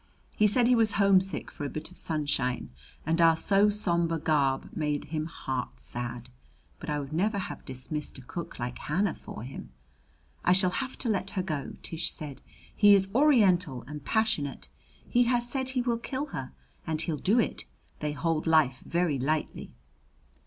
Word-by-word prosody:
He 210 - +4
said 240 +4 +3
he 250 - +4
was 225 -3 +3
homesick 195 -1 +2
for - - -7
a 140 - -2
bit 155 +5 -6
of 180 - -14
sunshine, 145 - +1 0.3
and 165 +2 +1
our 165 -1 +6
so 200 +4 +4
somber 170 -5 +2
garb 140 -4 0
made 150 -2 -1
him 155 0 -1
heart 130 -6 -5
sad. 120 0 -4 0.5
But 160 - -7
I 150 0 0
would 140 +1 -7
never 200 +6 +1
have 190 - -5
dismissed 135 +4 -3
a 130 - -11
cook 170 +7 -7
like 120 0 -5
Hannah 180 +5 0
for - - -9
him. 125 - -8 0.7
"I 180 - +5
shall 185 -1 +3
have 260 +5 -4
to 245 - -2
let 195 -2 -1
her 185 - +1
go," 155 -6 -4
Tish 165 0 -2
said. 145 -3 -5 0.3
"He 205 -1 +7
is 195 -1 +3
Oriental 195 - +3
and 150 0 -8
passionate. 215 -9 -1 0.4
He 245 0 +3
has 240 0 +2
said 260 +1 -2
he 255 -1 -1
will 235 -1 0
kill 265 +4 -3
her 130 -1 -5 0.4
and 160 -1 -1
he'll 160 -4 -2
do 210 - +2
it. 230 - -1 0.3
They 150 -1 -2
hold 155 +3 -1
life 150 -5 +3
very 170 -5 0
lightly." 150 - -2
165 Hz, 180 wpm, -28 LUFS, 145-205 Hz, 0.7 s, He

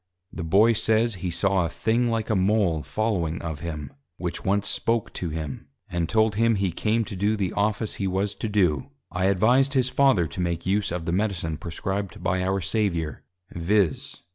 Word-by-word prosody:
The 85 - -5
Boy 100 +8 +5
says, 110 +1 +2
He 90 - -1
saw 95 +2 +1
a 85 - -1
thing 115 +6 +1
like 115 -2 -1
a - - +2
Mole 95 -4 +2
following 90 -5 -1
of 80 -3 -4
him, 75 -4 -6 0.2
which 85 -1 -4
once 100 +1 +1
spoke 115 -1 0
to 90 - -3
him, 75 -3 -5 0.2
and 85 -2 -1
told 110 -1 +3
him 115 +2 +3
he 95 -2 0
came 110 +6 0
to 105 - -7
do 105 +3 +1
the 95 -3 -1
Office 105 +2 0
he 95 - +1
was 95 +2 -1
to 110 +2 -4
do: 90 -10 +1 0.2
I 90 +2 -1
advised 120 +9 +3
his 130 -1 +3
Father 130 -9 +3
to 80 +4 -5
make 85 -1 -2
use 100 +1 +1
of 85 -1 -3
the 85 - -1
Medicine 90 -4 -1
prescribed 95 +4 -4
by 90 +1 +1
our 95 +1 0
Saviour, 90 - -1 0.3
_viz. 90 -1 0
95 Hz, 190 wpm, -25 LUFS, 85-110 Hz, 0.3 s, Boy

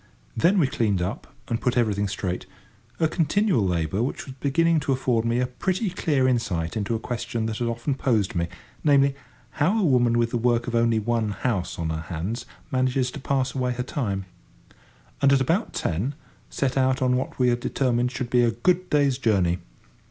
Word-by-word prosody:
Then 175 - +3
we 170 - +4
cleaned 110 -7 0
up, 90 +1 -4 0.2
and 115 - -2
put 125 0 0
everything 105 -4 +1
straight 95 -2 -3 0.5
(a 160 - +3
continual 175 - +1
labour, 90 +1 0
which 125 - -2
was 135 - -8
beginning 165 +4 +2
to 140 -1 -2
afford 125 -3 +1
me 115 +1 +1
a 125 - +2
pretty 185 - -2
clear 145 -7 +1
insight 105 -9 -1
into 110 +1 -1
a - - -2
question 115 -1 -3
that 110 -1 -3
had 120 - 0
often 115 +4 -1
posed 115 -6 0
me—namely, 135 - +1 0.5
how 185 +9 +3
a - - +1
woman 120 -6 +3
with 115 -1 +1
the 120 - 0
work 120 0 +2
of 125 - -4
only 115 -1 +3
one 110 0 0
house 105 -3 -2
on 80 -1 -2
her 80 0 -3
hands 90 +9 -4 0.2
manages 130 0 +1
to 145 - -7
pass 135 -1 0
away 125 -2 0
her 125 +1 -3
time), 100 -8 -3 1.0
and, 140 - +5
at 140 - +5
about 165 - 0
ten, 105 - -2 0.3
set 135 -1 -1
out 130 0 +2
on 125 0 +3
what 130 - -3
we 125 -1 +3
had 120 0 +1
determined 125 -1 0
should 120 -1 -4
be 125 - +4
a 120 - +4
good 175 +11 +1
day's 140 -3 +2
journey. 95 -7 +2
120 Hz, 195 wpm, -25 LUFS, 110-135 Hz, 1.0 s, and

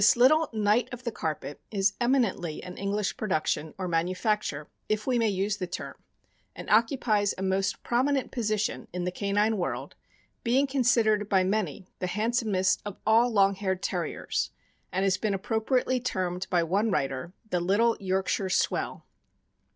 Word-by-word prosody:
little 305 +6 +5
knight 215 +1 +2
of 245 0 -8
the 235 - -2
carpet 155 -6 -4
is 200 -1 +1
eminently 230 - +1
an 180 0 -8
English 200 +1 -1
production, 160 -5 -1
or 185 -1 -3
manufacture, 175 -2 -1 0.2
if 215 0 0
we 250 -2 +2
may 225 -1 +3
use 200 +1 -1
the 180 - -3
term, 175 - -6 0.6
and - - -8
occupies 215 -2 +3
a 190 - -4
most 190 0 0
prominent 265 +3 +1
position 215 -3 -1
in 180 0 -2
the 180 - -1
canine 205 +3 +1
world, 175 - -3 0.5
being 255 +4 +3
consider 240 -5 +3
d 205 - -4
by 195 -2 +3
many 190 -2 -1
the 180 - -1
handsomest 210 -2 +1
of 205 -2 -6
all 230 +3 +4
long 200 -2 +4
haired 190 -1 -2
Terriers, - - -2 0.4
and 190 +1 0
has 190 -1 +2
been 205 0 0
appropriately 230 +6 0
termed 185 -6 -2
by 175 -2 +2
one 200 +7 +1
writer 135 -1 -2 0.2
"the 180 - +2
little 205 +7 +3
Yorkshire 190 0 0
swell." - - 0
205 Hz, 160 wpm, -28 LUFS, 185-230 Hz, 0.6 s, little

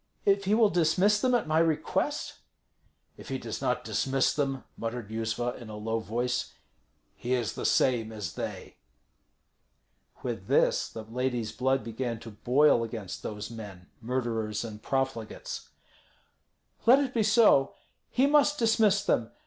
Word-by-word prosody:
If 200 0 +3
he 205 +3 +3
will 220 -2 +4
dismiss 180 +5 +3
them 250 -1 +3
at 235 - +1
my 155 +1 +2
request?" 165 -2 0 0.8
"If - - -11
he - - -2
does - - -6
not - - 0
dismiss 135 0 +1
them," 135 -3 -1
muttered 115 -1 -5
Yuzva, 115 +2 -2
in 115 - -9
a 105 - -7
low 110 +2 -2
voice, 120 +3 -2 0.6
"he 125 - -2
is 115 -3 -2
the - - -2
same 115 -4 +2
as 105 -7 -5
they." - - -6 1.5
With - - -4
this - - +2
the 110 - -8
lady's 120 0 -2
blood 130 +1 0
began 115 0 -4
to 115 - -9
boil 125 +4 +3
against 110 -5 -6
those 105 +1 -6
men, 100 -6 -10
murderers 115 -3 -2
and 110 -2 -8
profligates. 135 -4 -3 1.2
"Let 250 +3 +9
it 275 -2 -1
be 230 - +2
so. 210 -10 +4 0.3
He 260 - +2
must 295 +1 +4
dismiss 220 -4 +3
them. 115 - +1
125 Hz, 150 wpm, -28 LUFS, 115-185 Hz, 1.5 s, Let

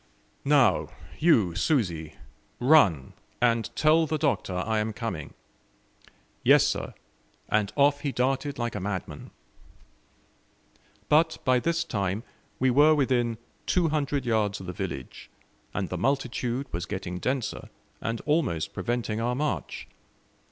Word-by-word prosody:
"Now, 140 -5 +3 0.3
you 115 - +4
Susi, 85 - 0 0.4
run, 115 - +4 0.3
and 115 -2 +2
tell 160 +1 +4
the 155 +1 -1
Doctor 135 -11 0
I 110 +4 0
am 110 +1 -2
coming." 105 -10 -5 1.1
"Yes, - - +6
sir," - - -2 0.5
and 105 -1 +1
off 145 0 +4
he 145 -1 -2
darted 135 +3 -1
like 120 -1 -2
a 105 - -3
madman. 95 -6 -5 1.8
But 160 +2 +3
by 130 -1 +4
this 170 +5 0
time 100 0 -2 0.4
we 130 0 +3
were 150 +4 +6
within 125 -5 +1 0.3
two 175 -3 +2
hundred 145 -3 -1
yards 110 -3 0
of 95 - -9
the 90 - -5
village, - - -6 0.4
and - - -3
the - - -4
multitude 130 -1 -1
was 85 +2 -3
getting 95 -3 -4
denser, 130 -1 -3 0.3
and 115 0 -3
almost 150 - 0
preventing 115 -2 -2
our 120 +1 0
march. 150 +2 -3
120 Hz, 130 wpm, -27 LUFS, 105-145 Hz, 1.8 s, Yes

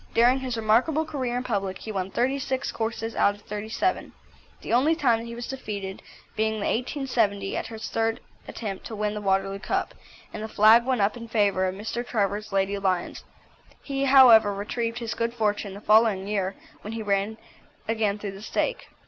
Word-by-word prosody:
During 245 +3 +5
his 255 -3 -3
remarkable 240 +9 +2
career 260 -6 -2
in 250 - -2
public 195 -6 -2
he 220 - -7
won 190 -2 -2
thirty 260 +7 0
six 265 -1 -2
courses 225 0 -3
out 205 - +3
of 205 - -18
thirty 210 +1 -6
seven, 365 +10 -1 0.5
the - - -3
only 285 +7 +4
time 245 -8 +2
that 230 - -7
he 235 0 -7
was 240 0 -6
defeated 205 -7 -5 0.3
being 220 0 +1
the 215 -2 -3
1870 230 -6 0
at - - -3
his 225 -1 -6
third 225 +1 0 0.3
attempt 200 -4 -5
to 225 - -6
win 210 0 -1
the 210 - -5
Waterloo 195 0 0
Cup, - - -2 0.4
and - - -5
the 220 - -4
flag 220 +2 +6
went 255 -4 +1
up 200 +4 +2
in 230 -1 -8
favour 200 -4 +2
of 185 - -3
Mr. 220 +4 -4
Trevor's 210 -3 -1
Lady 195 +1 0
Lyons. 185 -3 -1 0.6
He, 275 -1 -1
however, 245 -6 +7
retrieved 230 +3 -3
his 235 -1 -3
good 235 +1 -2
fortune 205 -3 -1
the 200 - -9
following 210 -3 +4
year, 195 -2 -1 0.3
when 215 - -7
he 225 - -4
again 205 +1 0 0.5
ran 215 -2 0
through 205 -1 -5
the 195 +1 -11
stake. - - -2
220 Hz, 195 wpm, -26 LUFS, 200-240 Hz, 0.6 s, however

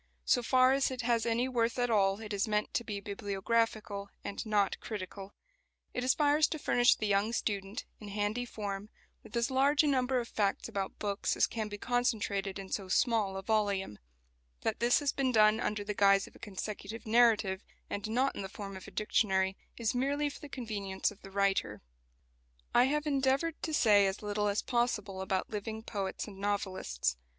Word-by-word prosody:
So 245 - +3
far 255 +2 +4
as 275 0 +2
it 255 -1 -4
has 235 -1 +1
any 235 +2 +1
worth 235 -2 0
at 245 -1 +1
all 195 -1 +3
it 215 -1 -6
is 200 +3 0
meant 210 0 0
to 235 - 0
be 205 -3 -4
bibliographical 205 +1 -1
and 200 - -4
not 205 -2 +1
critical. 195 -1 -7 0.6
It 250 - -2
aspires 290 +3 +4
to 315 - -3
furnish 245 -4 +4
the 215 - -3
young 205 +2 +2
student, 200 -1 -2
in 210 - -9
handy 205 +4 -1
form, 205 -3 -5 0.3
with 225 - -6
as 235 +2 +1
large 280 +3 +4
a - - +2
number 260 -2 +2
of 235 - -4
facts 200 -3 0
about 195 -1 -4
books 200 -1 -1
as - - +5
can 220 -2 -3
be 205 0 -6
concentrated 210 -5 0
in 195 -1 -7
so 195 -2 -2
small 210 -1 +2
a 195 - -5
volume. 200 - 0 0.6
That - - -1
this 240 +1 +4
has 285 -2 +1
been 265 -2 0
done 215 -1 +5
under 210 -3 -1
the 210 +1 -3
guise 195 -1 +4
of - - -16
a - - -15
consecutive 210 +2 -6
narrative, 215 -4 +4 0.3
and 205 +1 -4
not 255 +5 +1
in - - -4
the 195 - -5
form 195 0 -7
of 190 - -9
a - - -10
dictionary, 190 -3 +1 0.2
is 230 -2 0
merely 285 +4 0
for - - -11
the 295 - -10
convenience 210 -8 -2
of 210 - -16
the 195 - -11
writer. 195 - 0 0.9
I 245 - +6
have 300 +3 0
endeavoured 280 +3 +1
to 320 - -3
say 205 -9 +5
as 195 +2 -4
little 210 0 0
as 205 0 0
possible 210 -6 -1
about 190 0 -2
living 220 +1 -4
poets 200 -4 -3
and 195 -2 -10
novelists. 185 - -1
215 Hz, 195 wpm, -32 LUFS, 200-245 Hz, 0.9 s, I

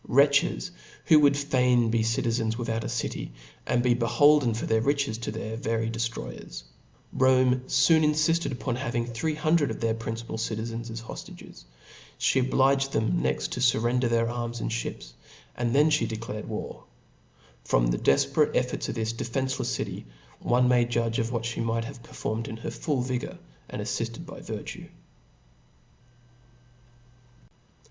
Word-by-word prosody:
Wretches, 140 +6 +3 0.3
who 155 -3 +7
I - - +3
would 140 -1 +5
fain 125 -5 +2
be 115 -1 +2
citizens 115 0 0
without 115 -2 -2
a - - -4
city, 120 -1 -3 0.3
and 120 0 +2
be 125 - +3
S 115 -1 -1
holden 145 -6 +5
for 115 - -3
their 110 0 +2
riches 140 -3 0
to 115 - -4
their 110 0 -5
very 115 -2 -1
deftroyers 115 - -5 0.5
I - - -9
Rome 130 -1 +5 0.2
foon 160 -2 +5
infilled 155 +2 +2
upon 125 -1 -3
having 120 -2 -2
three 120 +7 -2
hundred 155 0 +2
of - - -5
their 115 -1 +1
principal 115 0 -5
citizens 115 +1 -3
as 115 0 -6
hoftages; - - -10 0.5
(he 135 - +2
obliged 135 +1 +2
them 110 0 +1
next - - -1
to - - -3
furrender 120 0 +2
their 115 0 +2
arms 120 0 -3
and - - -2
(hips; - - -5 0.4
and 120 +1 -1
then 150 +2 +5
(he 115 - +2
declared 110 -1 -5
war 110 - -6 0.8
f. - - -19
From - - +4
the - - 0
defperate 70 - +2
ef - - +1
forts - - -4
of - - -3
this 110 -1 -1
defencelefs 130 +3 -2
city, - - -4 0.3
one 125 +1 +2
may 125 -1 +4
judge 115 -1 0
of 115 0 -1
what 115 -2 -2
(he 115 - -3
might 115 0 -1
have 125 0 -9
performed 115 -1 -4
in 110 - -6
her 115 - -5
full 140 -6 -1
vigour^ 125 -1 -3 0.3
andafliftcd - - -4
by - - -9
virtue. - - -7
120 Hz, 165 wpm, -27 LUFS, 115-130 Hz, 0.8 s, who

